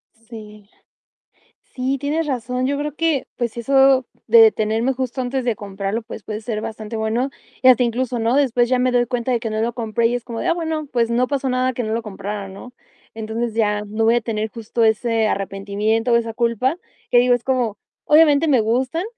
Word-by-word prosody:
Sí, 215 -2 -13
la - - -33 1.0
Sí, 260 +1 -1
tienes 300 +4 -1
razón. 250 -1 -2
Yo 280 +1 0
creo 295 -1 -3
que, 320 -4 0
pues, 235 -2 -3
eso 270 +2 +4 0.2
de 465 - +7
detenerme 225 - +2
justo 260 0 -4
antes 255 +1 -2
de 240 -2 +1
comprarlo, 200 +2 -4
pues 220 0 -9
puede 215 +1 -5
ser 215 -1 -4
bastante 215 0 -6
bueno 225 +5 -1 0.3
y 260 - +6
hasta 255 -1 +6
incluso, 245 +1 -1
¿no? 230 +2 +1
Después 245 -4 +2
ya 255 0 +2
me 255 0 +2
doy 245 -1 +2
cuenta 245 0 -2
de 240 - +2
que 230 - -3
no 215 0 -2
lo 235 - -1
compré 230 -1 0
y 240 - -2
es 245 -1 -3
como 230 -2 -6
de: - - -2
"Ah, 335 - +3
bueno, 320 -3 -3
pues, 235 -2 +1
no 245 +2 +2
pasó 275 -2 -1
nada 255 0 +1
que 245 - -3
no 215 - -3
lo 230 - -2
comprara", 205 -1 -6
¿no? 195 +6 -11 0.4
Entonces, 225 +1 -4
ya 210 -2 +1
no 215 +2 -1
voy 230 +1 +4
a - - +2
tener 220 -1 -3
justo 230 0 -2
ese 225 0 +2
arrepentimiento 205 +4 -1
o - - +6
esa 230 -1 -1
culpa 240 +5 0 0.3
que 245 - +5
digo, 245 0 +4
es 240 - -3
como 245 -6 -1 0.3
obviamente 300 0 +5
me 265 -5 +4
gustan, 255 - 0
235 Hz, 215 wpm, -20 LUFS, 220-255 Hz, 1.0 s, de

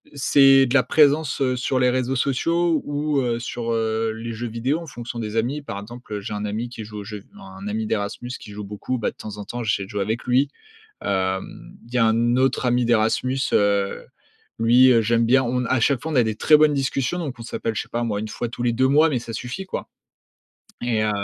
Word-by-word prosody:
c'est 135 -1 +6
de 120 - -2
la 140 - +7
présence, 150 -1 +3
heu, 130 -1 +2
sur 125 +1 -1
les 125 0 +4
réseaux 130 +1 0
sociaux 165 +6 +1
ou, 145 0 0
heu, 120 -2 0
sur, 120 0 -4
heu, 110 0 0
les 115 +1 -6
jeux 120 +2 -4
vidéo 120 +7 -1
en 170 - -9
fonction 120 -3 -7
des 110 -1 -4
amis. 130 +7 -1
Par 100 -8 -6
exemple, 120 +2 -10
heu, 105 - -2
j'ai 105 +2 -6
un 105 0 -3
ami 110 +3 -3
qui 120 -2 -8
joue 105 0 -8
au - - -6
jeu 105 +1 -7
v 100 - -20
un 95 +1 -10
ami 110 +2 -2
d'Erasmus 105 +3 -3
qui 105 - -11
joue 105 0 -7
beaucoup, 105 +5 -4
bah, 115 - -1
de - - -29
temps 105 -1 -8
en 105 - -6
temps 120 - -5
j'essaie 110 -3 0
de 95 - -10
jouer 105 -2 -3
avec 110 +4 -2
lui. 130 +3 +2 0.5
Hem, 95 -1 -3
il 120 - -13
y - - +2
a 115 - +4
un 115 +2 +2
autre 130 0 +1
ami 125 0 +2
d'Erasmus, 120 +3 +1
heu, 100 -1 +1 0.5
lui, 120 +3 +6
heu, 115 - +5
j'aime 115 +1 +2
bien 130 +3 +4
on 125 +1 -1
à 130 +1 +1
chaque 130 +1 +2
fois 160 - -4
on - - -2
a 125 - +6
des 110 -1 -1
très 150 - +6
bonnes 150 -1 +4
discussions 135 +3 -1
donc 150 -7 -4
on - - -8
s'appelle 115 0 -3
je - - 0
sais - - -15
pas 120 - -2
moi 105 -3 -1
1 110 - -5
fois 120 - -4
tous 120 +1 -6
les 120 - +2
2 130 +3 +2
mois, 150 +4 +5
mais 130 - 0
ça 115 - -8
suffit 125 +12 -5
quoi - - -5 0.9
et 115 -3 0
heu, 105 - +1
120 Hz, 250 wpm, -23 LUFS, 110-130 Hz, 0.9 s, la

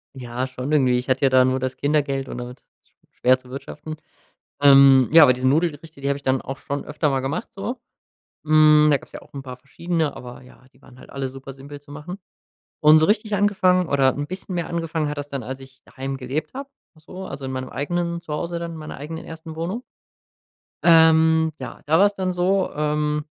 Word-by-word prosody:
Ja, 125 0 -4
schon 130 +3 -5
irgendwie. 130 -4 +3
Ich 125 - -6
hatte 130 +1 +1
ja 135 - +2
dann 130 0 +5
nur 130 0 0
das 130 0 -3
Kindergeld 140 -2 -1
und - - -6
damit 125 +1 -8 0.5
schwer 130 +1 +3
zu 125 -1 -17
wirtschaften. 150 +3 -8 0.7
Ähm, 135 -2 +7
ja, 165 - +9
aber 125 - +6
diese 130 +1 0
Nudelgerichte, 155 0 -1
die 140 - -2
habe 140 - 0
ich - - -18
dann 130 0 +1
auch 135 +1 -6
schon 140 0 -5
öfter 150 -1 -1
mal 135 - 0
gemacht 140 +12 -3
so. 235 +5 -5 0.7
Hm, 155 0 +6
da 145 - +4
gab - - -17
es - - -32
ja - - -8
auch - - -20
'n 140 - -7
paar 125 -1 -9
verschiedene, 160 +3 -3
aber 125 0 -10
ja, 125 +1 -19
die - - -26
waren 125 - -18
halt - - -15
alle 135 -1 -4
super 135 +1 -10
simpel 140 +2 -11
zu 145 0 -16
machen. 150 +6 -8 0.6
Und 155 0 +7
so 155 - +4
richtig 210 0 +1
angefangen 185 -3 +2
oder 135 -2 +2
'n 145 0 -4
bisschen 185 +1 -7
mehr 170 -1 -3
angefangen 165 -2 -2
hat 150 - -5
das 145 - -5
dann, 140 -3 -5
als 130 +4 -6
ich 130 -1 -16
daheim 135 +1 -6
gelebt 135 +4 -4
habe, 275 +1 -7 0.3
so, 180 +4 -10
also 135 -5 -8
in 130 - -4
meinem 130 0 -5
eigenen 170 +3 -3
Zuhause 170 +1 -4
dann, 170 0 -5
in - - -8
meiner 155 -1 -8
eigenen 155 +4 -7
ersten 160 0 -9
Wohnung. 180 +9 -4 1.0
Ähm, 160 -1 +5
ja, - - -8
da 160 +2 +3
war 200 - +6
es 205 - -1
dann 185 -2 -2
so, 185 +2 0
ähm 150 0 -1
150 Hz, 220 wpm, -22 LUFS, 135-165 Hz, 1.0 s, ja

